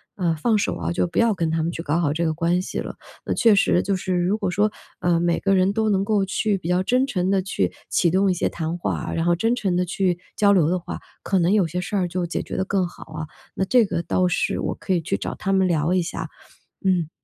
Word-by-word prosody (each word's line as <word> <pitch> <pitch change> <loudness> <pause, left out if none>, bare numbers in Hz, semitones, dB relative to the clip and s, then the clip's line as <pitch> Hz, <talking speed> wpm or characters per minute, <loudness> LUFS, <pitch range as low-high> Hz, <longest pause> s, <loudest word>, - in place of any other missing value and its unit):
呃， 170 -4 0
放 215 +8 +1
手 205 - -1
啊， - - -3
就 175 - 0
不 170 - -7
要 230 -1 +4
跟 170 -4 -1
他 160 0 0
们 165 - -1
去 165 - -5
搞 155 0 0
好 155 -4 +1
这 170 +2 -1
个 160 - +1
关 170 +2 +1
系 - - -6
了。 - - -5 0.3
那 - - 0
确 225 -4 +5
实 180 -2 +3
就 200 - 0
是 185 0 -2
如 180 +4 +1
果 200 -4 -2
说， 210 +3 +2 0.3
呃， 175 -1 +2
每 170 0 +1
个 195 0 +2
人 185 +1 +3
都 220 +1 0
能 195 -2 +2
够 200 -1 +1
去 200 +1 0
比 180 - -7
较 180 +1 +2
真 255 +6 +2
诚 185 -8 -1
地 195 -1 +2
去 195 - -1 0.2
启 175 - +2
动 190 +2 +3
一 - - +3
些 175 - 0
谈 165 +1 -3
话 175 - -2
啊， - - -4
然 165 - -1
后 175 0 +3
真 225 +7 +1
诚 195 -7 -1
地 180 - +1
去 180 0 0 0.2
交 205 -1 +4
流 175 -6 +4
的 180 - +1
话， 175 - -7 0.2
可 190 - +1
能 175 +3 +3
有 205 -4 +4
些 175 +3 -3
事 180 +3 -4
儿 185 -3 +1
就 175 +1 -2
解 170 - -3
决 - - -6
得 190 - 0
更 190 -1 +1
好 - - -12
啊， 155 0 -5 0.3
那 - - 0
这 240 +3 +4
个 170 -3 -2
倒 180 +1 +1
是 175 - 0
我 - - -2
可 190 - -2
以 175 - +1
去 160 - -1
找 - - -4
他 195 - -2
们 190 -1 +3
聊 165 0 +1
一 185 - +3
下， 165 -1 -4 0.6
嗯。 175 -5 +1
180 Hz, 300 characters per minute, -23 LUFS, 170-195 Hz, 0.6 s, 确